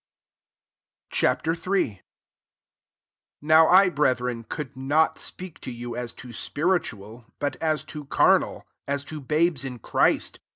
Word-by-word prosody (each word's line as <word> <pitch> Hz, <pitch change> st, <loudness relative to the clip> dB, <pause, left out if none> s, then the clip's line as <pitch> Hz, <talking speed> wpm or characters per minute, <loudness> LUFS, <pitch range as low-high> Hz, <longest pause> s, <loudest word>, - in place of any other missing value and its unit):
Ch. -, -, +2 dB
III. -, -, +1 dB, 0.5 s
1 100 Hz, -, -21 dB, 1.4 s
NOW 155 Hz, +1 st, +6 dB
I, 185 Hz, +1 st, +7 dB
breth 145 Hz, -6 st, +2 dB
ren, 120 Hz, -2 st, -3 dB
could 135 Hz, +2 st, -6 dB
not 145 Hz, +5 st, +1 dB
speak 180 Hz, -4 st, -8 dB
to -, -, -7 dB
you 120 Hz, 0 st, -6 dB
as 120 Hz, -1 st, -4 dB
to 125 Hz, -2 st, -11 dB
spiritual; 120 Hz, -, -2 dB
but 145 Hz, -1 st, -2 dB
as 155 Hz, -1 st, 0 dB
to 150 Hz, -2 st, -7 dB
carnal, -, -, +2 dB, 0.2 s
as 140 Hz, 0 st, -1 dB
to 155 Hz, +1 st, -7 dB
babes 155 Hz, 0 st, +1 dB
in 130 Hz, -2 st, -5 dB
Christ. 115 Hz, -, +1 dB
140 Hz, 135 wpm, -25 LUFS, 125-155 Hz, 1.4 s, I